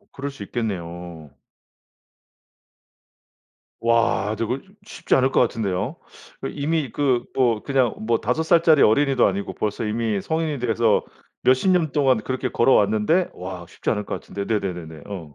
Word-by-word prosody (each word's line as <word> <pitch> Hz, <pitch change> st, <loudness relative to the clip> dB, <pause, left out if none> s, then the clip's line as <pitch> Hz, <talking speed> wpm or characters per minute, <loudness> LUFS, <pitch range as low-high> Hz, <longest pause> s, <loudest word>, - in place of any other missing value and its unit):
어. 205 Hz, -, -32 dB
그럴 140 Hz, +1 st, -5 dB
수 135 Hz, -7 st, -10 dB
있겠네요. 85 Hz, -, -5 dB, 2.5 s
와. 115 Hz, -2 st, +1 dB
저거 120 Hz, +5 st, -2 dB
좀 195 Hz, +1 st, -23 dB
쉽지 -, -, -1 dB
않을 130 Hz, 0 st, +3 dB
것 -, -, +3 dB
같은데요. 100 Hz, -6 st, -1 dB, 0.6 s
이미 150 Hz, -2 st, -1 dB
그 130 Hz, -4 st, +1 dB
뭐 120 Hz, -5 st, +2 dB
그냥 130 Hz, -4 st, +1 dB
뭐 115 Hz, -1 st, +2 dB
5 125 Hz, +8 st, 0 dB
살짜리 160 Hz, -2 st, +5 dB
어린이도 135 Hz, +4 st, +4 dB
아니고 100 Hz, +1 st, -2 dB
벌써 110 Hz, +2 st, -2 dB
이미 110 Hz, -2 st, -1 dB
성인이 160 Hz, +1 st, -2 dB
돼서 115 Hz, -2 st, +2 dB, 0.4 s
몇십 130 Hz, +9 st, +3 dB
년 170 Hz, -4 st, +2 dB
동안 135 Hz, -4 st, +3 dB
그렇게 130 Hz, +3 st, -3 dB
걸어왔는데 115 Hz, -, +3 dB
와 90 Hz, -1 st, -7 dB
쉽지 -, -, -3 dB
않을 105 Hz, -, -1 dB
것 -, -, -3 dB
같은데. 100 Hz, -, -6 dB
네네네네. 90 Hz, -8 st, -3 dB
어. 85 Hz, -8 st, -8 dB
115 Hz, 290 characters per minute, -23 LUFS, 100-135 Hz, 2.5 s, 살짜리